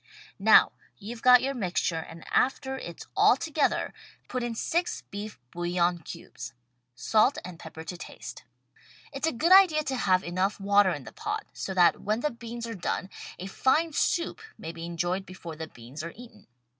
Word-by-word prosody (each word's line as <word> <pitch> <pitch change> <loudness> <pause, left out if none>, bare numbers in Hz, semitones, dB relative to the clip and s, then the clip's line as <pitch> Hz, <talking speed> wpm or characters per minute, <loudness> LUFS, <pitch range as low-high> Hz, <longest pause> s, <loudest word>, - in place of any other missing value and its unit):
Now - - +7 0.3
you've 225 +3 -8
got 250 0 +7
your 275 +1 0
mixture 180 -7 -1
and 165 +1 -10
after 265 0 +1
it's 170 -10 -8
all - - +6
together 305 0 +1
THE - - -1
STAG - - -7 0.3
COOK - - -40
BOOK - - -38
put 255 - -2
in 240 -1 -3
six 345 +9 -1
beef 205 -4 -6
bouillon 175 0 0
cubes; 120 -5 -9 0.4
salt 215 - +3
and 175 -2 -9
pepper 160 -1 -9
to 175 +2 -6
taste. - - -9 0.7
It's 275 +3 -1
a - - +2
good 320 +9 +1
idea 370 -5 +7
to 270 - -2
have 185 -7 +2
enough 185 +4 -1
water 200 0 +4
in 145 -6 -3
the - - -10
pot 425 0 -3
so 190 - -5
that 175 -2 +5
when 215 +3 0
the 300 - 0
beans 235 0 -7
are 230 - -5
done 190 0 -3 0.3
a 185 - -6
fine 300 +11 +2
soup 340 +7 0 0.2
may 160 - -6
be 165 0 -7
enjoyed 175 +3 -1
before 180 -4 -9
the 160 +1 -6
beans 125 +4 -10
are 170 - -6
eaten. 225 -3 -14
200 Hz, 195 wpm, -28 LUFS, 175-255 Hz, 0.7 s, Now